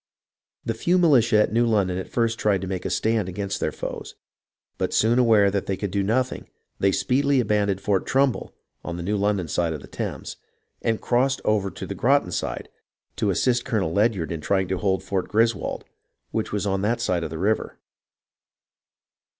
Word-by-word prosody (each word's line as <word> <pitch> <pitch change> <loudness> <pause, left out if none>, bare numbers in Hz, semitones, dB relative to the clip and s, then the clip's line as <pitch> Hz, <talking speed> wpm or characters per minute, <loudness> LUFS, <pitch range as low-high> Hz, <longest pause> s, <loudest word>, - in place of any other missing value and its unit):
The 115 - 0
few 175 +11 +1
militia 125 -10 +4
at - - -3
New 120 +1 +3
London 95 -5 +1
at 95 - -7
first 115 -1 0
tried 100 -3 +2
to 95 - -4
make 90 -1 -4
a - - 0
stand 110 -4 0
against 95 +1 -3
their - - -1
foes, - - -6 0.6
but - - -1
soon 115 +3 +3
aware 110 -5 +5
that 100 -1 -2
they 95 - -1
could 100 -1 -3
do 100 +1 0
nothing, 125 +6 -1 0.3
they 100 - +3
speedily 140 +6 +2
abandoned 100 -4 +1
Fort 100 -2 0
Trumbull 135 -2 +1 0.3
(on 85 - -5
the 85 - -5
New 105 +4 -1
London 100 -3 0
side 85 +1 0
of 75 - -6
the - - -11
Thames) - - -5 0.4
and 115 -1 0
crossed 130 +2 +1
over 105 -2 +1
to - - -7
the - - -5
Groton - - +2
side - - -3 0.5
to 105 - +1
assist 120 +6 +1
Colonel 100 -9 -1
Ledyard 100 -5 +1
in 80 -2 -4
trying 95 +3 +1
to 95 - -1
hold 95 0 0
Fort 95 -1 -2
Griswold, 115 +2 0 0.5
which 110 - -2
was 105 0 -1
on 95 -1 0
that 115 +4 0
side 90 -2 0
of 80 - -3
the 80 - -6
river. 105 +6 -1
105 Hz, 190 wpm, -24 LUFS, 95-115 Hz, 0.6 s, aware